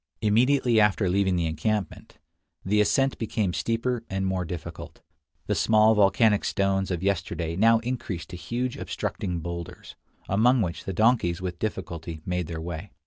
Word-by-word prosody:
Immediately 120 +2 +3
after 105 -1 +2
leaving 95 0 +2
the 85 -1 0
encampment, 90 +5 -3 0.5
the 105 +2 +3
ascent 135 +5 +1
became 105 -4 -1
steeper 115 +3 -1
and 95 0 -2
more 95 -1 -1
difficult; 85 0 -8 0.4
the - - 0
small 110 0 +4
volcanic 105 +1 +3
stones 95 -1 0
of 90 -1 -3
yesterday 90 -4 -1
now 115 +4 +5
increased 110 -9 -4
to - - -6
huge 120 +9 -3
obstructing 90 -4 -3
boulders, 85 0 -7 0.3
among 120 +6 +3
which 85 -3 -5
the 95 - -3
donkeys 105 -4 +2
with 90 -2 -5
difficulty 85 -6 -4
made 90 -2 -2
their 80 -1 -5
way. 85 +4 -6
95 Hz, 150 wpm, -26 LUFS, 85-110 Hz, 0.5 s, now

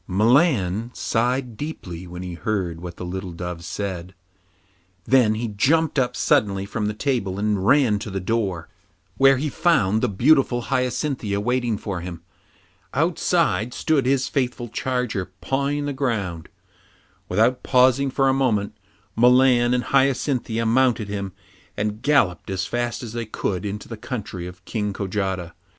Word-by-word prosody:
Milan 110 - +2
sighed 125 +1 -1
deeply 95 - -6
when 90 +1 -7
he 90 -1 -5
heard 85 -3 -2
what 90 -1 -7
the 90 - -6
little 95 0 -5
dove 90 0 -6
said. 95 -2 -5 0.9
Then 125 -5 +4
he 115 +2 -2
jumped 150 +9 +2
up 125 -1 0
suddenly 100 -4 +2
from 105 +1 -2
the 105 - -3
table 105 -6 -1
and 105 -2 0
ran 125 -7 +4
to 105 - -6
the 95 -1 -3
door, 95 -4 -2 0.5
where 135 0 +6
he 150 +4 -1
found 115 - +2
the 125 - +1
beautiful 125 +3 +3
Hyacinthia 125 -5 -1
waiting 120 0 0
for 100 -3 -4
him. 85 -1 -7 0.7
Outside 110 +7 +1
stood 140 -5 +1
his 135 0 +2
faithful 125 -3 -2
charger, 125 -6 -2
pawing 140 - -1
the 145 - -2
ground. 105 - -2 0.8
Without 115 +7 +2
pausing 130 +1 +3
for 135 +1 +1
a 135 - +4
moment, 110 -7 0 0.4
Milan 125 0 +5
and 125 0 +1
Hyacinthia 130 -4 +1
mounted 115 -2 +2
him 100 -1 -4 0.5
and 105 +1 -2
galloped 105 - +2
as 95 0 -2
fast 120 0 -2
as 115 -2 -7
they 115 -2 -4
could 100 -2 -2
into 105 +1 -6
the 115 - -7
country 105 -6 -5
of 90 0 -12
King 105 -3 -2
Kojata. 95 -3 -3
110 Hz, 150 wpm, -23 LUFS, 95-130 Hz, 0.9 s, where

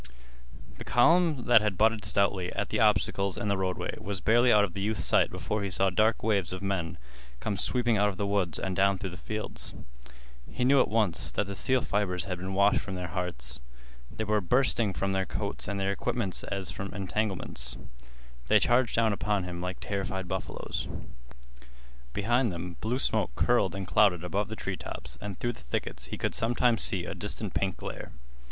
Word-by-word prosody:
The - - -5
column 155 +1 +3
that 120 -3 +7
had 105 -3 -1
butted 110 -1 +3
stoutly 100 -2 +1
at - - -2
the - - -1
obstacles 100 -1 +2
in 105 - -2
the 100 - +2
roadway 95 -1 -2
was 100 -1 -4
barely 120 +5 +4
out 105 -1 +6
of 95 -4 -2
the 100 - -4
youth's 105 +1 0
sight - - +4
before 105 0 -3
he 100 - -2
saw 95 +1 +2
dark 110 +4 +2
waves 100 -5 +1
of 95 +1 -6
men 95 -4 -2 0.4
come 105 - -2
sweeping 120 +3 +1
out 105 +1 +3
of 95 - -6
the 100 - -1
woods 100 -6 0
and 95 -1 -3
down 100 +1 +3
through 95 -1 -5
the - - -8
fields. 110 +2 -5 0.7
He 125 - -1
knew 135 +1 +6
at - - +2
once 105 -4 0
that - - -1
the 100 - -5
steel 130 +6 +1
fibers 90 -4 -1
had 90 -1 -4
been 95 +1 -4
washed 100 +1 +4
from 95 - -6
their 90 -1 -4
hearts. 90 -6 -3 0.5
They 110 - -4
were 105 0 +1
bursting 120 +1 +2
from 95 +1 -1
their 95 -1 0
coats - - -3
and 100 0 -2
their 95 0 +1
equipments 100 -1 -2
as 100 -2 -4
from 100 0 -6
entanglements. 100 0 -2 0.7
They - - +6
charged 120 -1 +3
down 115 -2 +3
upon 100 -1 0
him 90 -1 -5
like 90 0 -4
terrified 95 -2 -3
buffaloes. - - -4 1.2
Behind 120 - +1
them 85 0 -6
blue 115 +4 0
smoke - - 0
curled - - +2
and 95 0 -4
clouded 95 -3 +3
above 100 +3 -1
the 110 - -6
treetops, 70 - -6
and 100 -3 -5
through 120 0 -1
the - - -14
thickets - - -3
he - - -6
could - - -1
sometimes 120 0 +2
see 90 -3 +4
a - - -4
distant 105 -1 -4
pink 95 -2 -1
glare. - - -7
100 Hz, 195 wpm, -29 LUFS, 95-110 Hz, 1.2 s, that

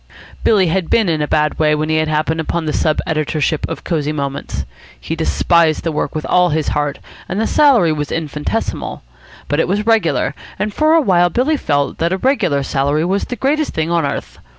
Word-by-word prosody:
Billy 205 -4 +4
had 175 0 -1
been 225 -4 +3
in 160 -3 0
a 150 - 0
bad 150 0 0
way 150 -1 +3
when 155 +1 -1
he 155 - +2
had 155 0 +1
happened 155 +1 0
upon 165 +1 -2
the 155 - -1
sub 155 -1 +1
editorship 155 -1 -1
of - - -6
Cosy 150 -4 -1
Moments. 140 -2 -4 0.3
He 160 - -4
despised 165 0 +2
the 165 - -1
work 150 - -3
with 155 - -3
all 180 0 +3
his 155 0 0
heart, 145 -1 -1 0.3
and 190 - -2
the 225 - +1
salary 245 - +4
was 150 -1 -3
infinitesimal. 150 -2 -3 0.4
But 145 - 0
it - - +2
was 205 +3 -1
regular, 170 - +2 0.2
and 210 0 -2
for 310 +5 +3
a 330 - +5
while 175 - +3
Billy 260 - +1
felt 145 - -1
that 170 +1 +1
a - - 0
regular 185 - +1
salary 140 +4 0
was 195 +3 0
the 245 - -5
greatest 295 +4 -1
thing 160 +1 -1
on 170 -1 +2
earth. 140 0 -4
160 Hz, 210 wpm, -17 LUFS, 150-190 Hz, 0.4 s, a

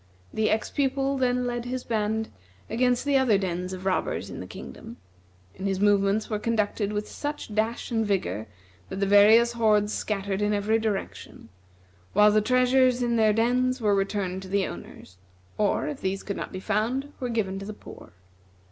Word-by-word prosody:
The 220 0 +1
ex 220 - 0
pupil 275 0 0
then 250 -1 +1
led 240 -1 -3
his 250 0 -4
band 220 0 -1 0.4
against 245 +2 +1
the 280 -1 +3
other 240 -6 +3
dens 180 -1 -3
of 185 0 -7
robbers 190 -1 -1
in - - -7
the - - -7
kingdom, - - -10 0.6
and 195 - -4
his 195 -1 -1
movements 205 +1 +2
were 210 -2 -2
conducted 210 -2 -1
with 210 0 -3
such 290 -7 -5
dash 220 +4 -1
and 225 -1 +1
vigor 115 - -1 0.4
that - - -5
the 200 - +2
various 215 +4 +6
hordes 215 -3 +2
scattered 200 -1 -2
in 210 0 +1
every 210 +2 +1
direction, 215 -3 -4 0.6
while 210 0 +6
the 215 +1 +3
treasures 255 +1 +3
in 235 -1 +1
their 220 -2 +4
dens 250 +4 +1
were 210 -3 +2
returned 195 -1 -1
to 190 - -9
the 195 0 +1
owners, 90 - -10 0.4
or, 210 +7 +1
if 295 -3 -5
these 190 +1 -2
could 200 - -4
not - - -5
be 185 - -5
found, 235 +8 -1
were 250 - -3
given 195 -5 -1
to 195 - -7
the - - -4
poor. 205 - -12
215 Hz, 185 wpm, -26 LUFS, 200-245 Hz, 0.6 s, various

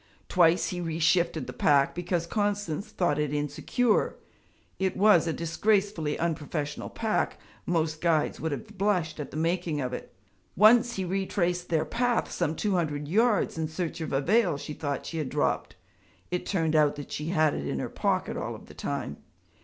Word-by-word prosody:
Twice 175 -1 +4
he 180 -1 -4
reshifted 165 -2 +1
the - - -7
pack 140 -2 +3
because 175 -1 -1
Constance 205 -2 -1
thought 175 -8 0
it 150 -2 0
insecure 150 - 0 0.6
(it 190 -1 0
was 190 -5 +5
a - - +1
disgracefully 170 -1 0
unprofessional 150 -2 -3
pack; 220 -1 -1 0.3
most 160 -2 0
guides 165 -3 +1
would 160 - -2
have 210 +7 -7
blushed 180 -6 0
at 150 - -5
the 150 - -7
making 165 -1 0
of 125 -2 -2
it); - - -6 0.4
once 235 +3 +6
he 190 - -2
retraced 180 -1 -1
their 160 -2 +1
path 245 0 0
some 165 -2 -1
two 210 - -1
hundred 150 -5 -1
yards 210 -1 +2
in 160 - 0
search 165 +1 -4
of 160 - -4
a 135 - +1
veil 185 -1 +3
she 150 - -6
thought 145 -3 -3
she 165 - -4
had 145 -4 -2
dropped - - -1 0.6
it 180 - -2
turned 165 -5 +1
out 150 -2 +4
that 145 - -8
she 150 - -4
had 155 -3 +2
had - - -3
it 70 - -5
in 70 - -2
her - - -2
pocket - - -1
all - - -4
of - - -12
the - - -14
time. - - -4
170 Hz, 185 wpm, -28 LUFS, 155-195 Hz, 0.6 s, once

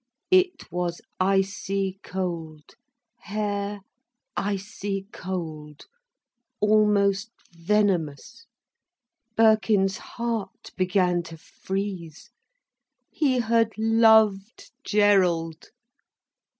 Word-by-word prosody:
It 370 - +2
was 175 0 -2 0.2
icy 195 0 0
cold, 165 -5 -5 0.5
hair 205 -1 -3 0.5
icy 195 0 -3
cold, 155 -5 -6 0.7
almost 210 -1 +3 0.2
venomous. 195 - -1 0.9
Birkin's 215 -3 +3
heart 230 -5 -5
began 180 -1 +1
to 165 - -10
freeze. 190 -2 -6 0.8
He 260 -5 +1
had 230 -1 +2
loved 220 -2 +3
Gerald. 180 -6 +2
195 Hz, 65 wpm, -25 LUFS, 180-215 Hz, 0.9 s, almost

